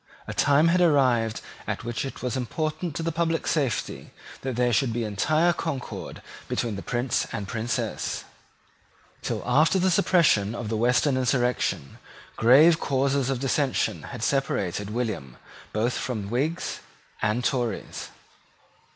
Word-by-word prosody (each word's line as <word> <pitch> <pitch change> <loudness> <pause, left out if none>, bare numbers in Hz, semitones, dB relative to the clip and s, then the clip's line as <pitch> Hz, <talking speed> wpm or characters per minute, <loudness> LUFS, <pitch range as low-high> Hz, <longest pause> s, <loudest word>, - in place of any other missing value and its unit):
A - - -5
time 145 +3 +4
had 180 +1 +3
arrived 130 -9 +3 0.3
at - - -3
which 120 +2 -3
it 135 - -7
was 125 0 -1
important 155 +5 -3
to 165 - -3
the 165 - 0
public 165 0 0
safety 140 -7 -1 0.3
that 130 -2 -3
there 120 0 +2
should 120 +3 +2
be 120 0 -1
entire 155 - +2
concord 145 -6 -5 0.2
between 115 -4 -2
the 100 - -5
Prince 120 +2 -1
and 105 -5 -4
Princess. 115 +3 -2 1.0
Till - - -3
after 155 +9 +4
the 185 0 +2
suppression 165 - +3
of 120 -3 -4
the 110 - -1
Western 125 +4 +2
insurrection 125 - 0 0.4
grave 150 +8 +6
causes 135 0 +1
of 135 -2 -1
dissension 135 +1 0
had - - -6
separated 105 -8 0
William 105 - -3 0.3
both 115 +3 0
from 110 -5 -3
Whigs 145 +8 -1 0.4
and 110 +3 0
Tories. 120 -6 -2
125 Hz, 140 wpm, -26 LUFS, 115-150 Hz, 1.0 s, grave